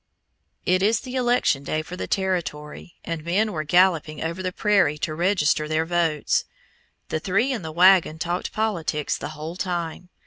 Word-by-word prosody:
It 185 +1 +2
is 215 +3 +2
the 255 -1 -8
election 245 - +2
day 155 +2 -2
for 175 - -8
the - - -5
Territory, 175 -4 -3
and 165 -2 -4
men 200 +6 +1
were 155 -5 -3
galloping 165 -2 +2
over 165 +3 -3
the 185 0 -2
prairie 190 -7 +2
to 155 +1 -3
register 165 -3 +1
their 155 +1 0
votes. 165 -3 +1 0.7
The 155 - -1
three 200 +11 +1
in 235 - -3
the 160 -2 -6
wagon 180 -1 +5
talked 175 +2 -3
politics 170 -9 -1
the 145 - -5
whole 155 +3 -6
time. 175 -2 -4
175 Hz, 170 wpm, -24 LUFS, 155-190 Hz, 0.7 s, wagon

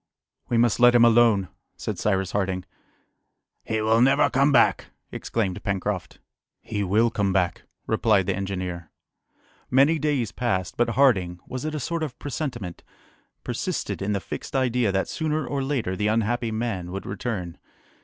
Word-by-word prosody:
"We 120 - +1
must 120 0 +3
let 120 0 +6
him 120 -1 +7
alone!" 115 -4 +4 0.3
said - - -4
Cyrus 95 -3 0
Harding. 95 -2 -1 1.0
"He 110 -1 -1
will 110 +2 +3
never 135 +3 +4
come 140 +3 +3
back!" 120 -4 +3 0.2
exclaimed 100 -6 -2
Pencroft. 100 -2 -3 0.4
"He 105 -2 -3
will 110 +5 +2
come 100 -3 0
back," 90 -2 0 0.2
replied 110 -3 +2
the 100 -1 0
engineer. 90 -3 -4 0.8
Many 140 +5 +4
days 140 -7 0
passed; 95 -7 -2
but 120 - +1
Harding 95 -11 +3
was 130 +2 -6
it 155 0 -3
a - - -2
sort 170 +5 -3
of 150 -5 -4
presentiment? 125 - -5 0.6
persisted - - -3
in 100 +2 -1
the 100 - 0
fixed - - -7
idea 125 -4 +2
that 95 0 0
sooner 155 -2 -2
or 140 +1 -2
later 135 -9 -1
the 105 +3 0
unhappy 115 +2 0
man 110 -6 -3
would 95 +1 -5
return. 95 -4 -4
110 Hz, 155 wpm, -25 LUFS, 95-125 Hz, 1.0 s, him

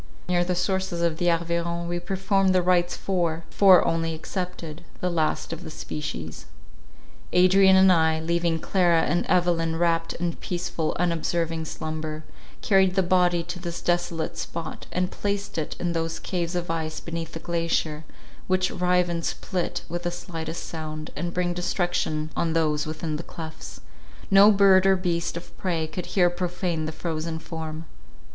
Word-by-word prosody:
Near 175 -1 +2
the 180 0 -1
sources 185 -1 -1
of 165 -2 +1
the 175 0 +2
Arveiron 170 0 -1
we 175 0 -2
performed 190 +1 +1
the 180 - +4
rites 175 -1 +2
for, 170 -4 -1
four 190 -3 +6
only 165 -1 0
excepted, 175 -2 -5 0.2
the 180 - -1
last 160 0 0
of 165 +2 -7
the 160 - -7
species. 80 - -6 0.9
Adrian 190 +1 +6
and 190 0 +7
I, 160 -1 +3
leaving 170 0 0
Clara 170 -1 +3
and 175 - 0
Evelyn 170 -3 +2
wrapt 165 0 +1
in 170 0 -2
peaceful 175 -3 -2
unobserving 165 -1 0
slumber, 155 0 -5 0.4
carried 190 -2 +4
the 190 - +3
body 175 -1 +3
to 175 +1 -6
this 175 -1 -5
desolate 175 -2 -1
spot, 165 -1 -6
and 180 0 -1
placed 200 -3 -2
it 155 - -4
in 175 - -1
those 165 0 -2
caves 175 -1 -3
of 175 -1 -2
ice 160 -1 -3
beneath 165 -1 -5
the 165 - -5
glacier, 165 -2 -1 0.4
which 185 0 +2
rive 180 -1 +2
and 170 -1 -2
split 180 +1 -2
with 175 +1 -4
the 175 - -1
slightest 170 -2 -5
sound, 155 -1 -6
and 170 +4 -3
bring 175 0 0
destruction 175 -3 -1
on 165 -1 0
those 155 -2 +1
within 155 0 -3
the - - -5
clefts—no 160 - 0
bird 195 -2 +6
or 195 - +6
beast 170 -2 -1
of 170 - -10
prey 170 -4 0
could 165 +3 -6
here 175 -3 +3
profane 175 -2 -2
the - - -3
frozen 160 0 -3
form. 160 -1 -6
170 Hz, 160 wpm, -25 LUFS, 160-180 Hz, 0.9 s, and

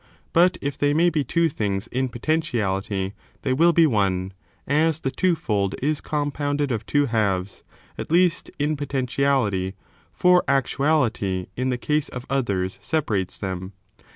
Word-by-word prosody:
But 180 +2 +4
if 140 -1 -3
they 145 0 +2
may 170 +2 +4
be 155 -4 0
two 170 +6 +2
things 100 -9 -2
in 130 +1 -2
potentiality, 105 -8 -1 0.3
they 130 - +1
will 165 +6 +5
be 165 0 +5
one; 95 -7 0 0.3
as 155 +2 +2
the 135 - -1
two 180 +3 +2
fold 100 -9 -1
is 150 +2 0
oompoimded 145 -1 -1
of 115 -2 -3
two 145 -1 +2
halves, 100 -6 -1 0.4
at - - -5
least, 175 +1 +2
in 150 +1 0
potentiality, 130 -8 0 0.4
for 180 0 +4
actu 135 -2 +1
ahty 115 - +1
in 130 +1 -1
the 125 - 0
case 150 +4 0
of 125 0 -7
others 100 -9 -1
separates 105 - -1
them. 95 0 -5
135 Hz, 155 wpm, -23 LUFS, 100-150 Hz, 0.4 s, will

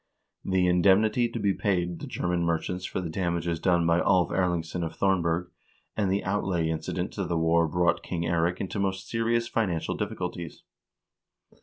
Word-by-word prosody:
The 95 -1 +1
indemnity 100 +6 +4
to 115 - -5
be 100 -2 +2
paid 90 -4 -1
the - - -7
German 90 0 -1
merchants 85 +2 -1
for - - -3
the 85 - -4
damages 85 -1 -1
done 85 -2 +2
by 85 +1 +3
Alv 90 -2 +3
Erlingsson 85 -1 -1
of 80 - -4
Thornberg, 90 -2 +1 0.4
and 100 -3 0
the 100 - 0
outlay 95 -4 0
incident 80 +3 -3
to 100 - -2
the 85 -2 -1
war 80 +1 +3
brought 85 +1 +1
King 85 -2 -3
Eirik 85 +1 0
into 100 +2 -3
most 95 -1 -2
serious 115 +1 0
financial 95 -9 -1
difficulties. 90 -5 -5
90 Hz, 165 wpm, -27 LUFS, 85-95 Hz, 0.4 s, indemnity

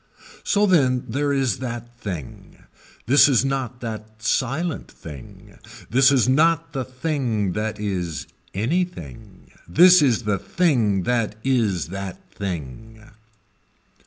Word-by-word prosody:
So 205 0 +2
then 130 -10 +3
there 145 +5 -1
is 135 -6 0
that 120 -1 -6
thing. 85 - -8 0.4
This 140 +5 +6
is 135 -1 +3
not 130 -2 -3
that 110 -1 -7
silent 140 +8 -1
thing. 70 -6 -12 0.3
This 130 +2 +5
is 130 -4 +3
not 155 +5 +2
the 135 -2 -2
thing 125 - -2
that 105 +1 -3
is 90 -6 -3 0.3
anything. 115 - -4 0.2
This 180 - +7
is 125 -5 +2
the 105 -2 0
thing 115 - +1
that 115 -2 0
is 110 -11 0
that 95 0 -6
thing. 100 - -7
120 Hz, 120 wpm, -22 LUFS, 105-135 Hz, 0.4 s, This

